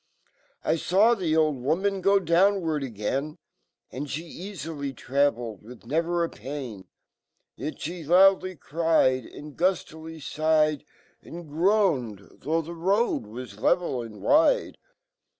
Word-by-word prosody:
I - - +2
faw 200 +8 +4
fho 170 -8 0
old 155 -3 +2
woman 190 +8 0
g 195 +2 +4
downward 170 -2 +2
agalru 135 +5 -3 0.5
And 145 +3 -5
fhe 155 +5 -5 0.2
eaflly 145 -6 -5
travelled, 120 -6 0
wifh 115 +2 -13
never 170 +5 0
apaln; 130 -11 -7 0.7
Yet 150 +3 -5
fhe 165 -1 -6
loud 190 +3 +6
I - - -3
y 185 -2 -9
cried, 150 -6 +1
Andguflilyflghed, 155 -2 -1 0.4
And 170 0 -10
groaned, 150 - +1
though 160 +4 -1
frie 170 +2 -8
road 190 - 0
was 110 -2 -9
lev&l 130 0 +1
and 110 -4 -10
wide. - - +3
155 Hz, 120 wpm, -26 LUFS, 135-175 Hz, 0.7 s, loud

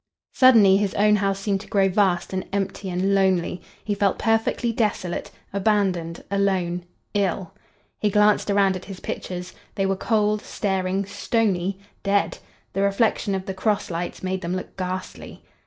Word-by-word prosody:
Suddenly 220 -7 +7
his 200 -1 -1
own 210 +1 +4
house 195 -1 0
seemed 195 -1 -1
to 210 - -12
grow 195 -1 +3
vast 190 -2 +1
and 185 0 -1
empty 195 0 -2
and 185 +2 0
lonely; 185 -3 +1 0.2
he 210 - -1
felt 200 -1 +1
perfectly 225 +1 +1
desolate,—abandoned—alone—ill! 190 -2 -1 0.5
He 210 - +2
glanced 210 +1 +3
around 200 -1 +3
at 185 - -7
his 195 -2 -8
pictures. 180 0 -5 0.2
They 195 - 0
were 195 0 +1
cold, 210 +1 +1
staring, 190 0 -1
stony, 195 -3 0 0.2
dead! 200 0 +1 0.3
The 195 - 0
reflection 200 0 +1
of 190 0 -4
the 190 - -4
cross 205 0 -1
lights 175 +2 -4
made 190 0 -2
them 175 0 -2
look 185 - -6
ghastly. 185 0 -6
195 Hz, 145 wpm, -24 LUFS, 185-205 Hz, 0.5 s, Suddenly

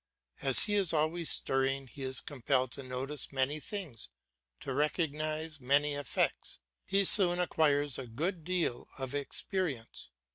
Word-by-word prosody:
As 135 -2 +10
he 205 - -1
is 195 -5 +3
always 160 +2 -1
stirring 135 +1 -1
he 130 +2 -14
is 130 -1 -3
compelled 130 -2 -2
to 140 - -9
notice 130 +2 -4
many 135 +2 -2
things, 170 - -8 0.5
to 135 - -6
recognise 155 +1 -3
many 140 +3 +1
effects; 145 -2 -3 0.3
he 195 0 +1
soon 180 -3 +8
acquires 145 -6 0
a 130 - -8
good 165 - -4
deal 175 -7 -3
of 135 -1 -6
experience. 145 - -4
145 Hz, 140 wpm, -30 LUFS, 135-165 Hz, 0.5 s, As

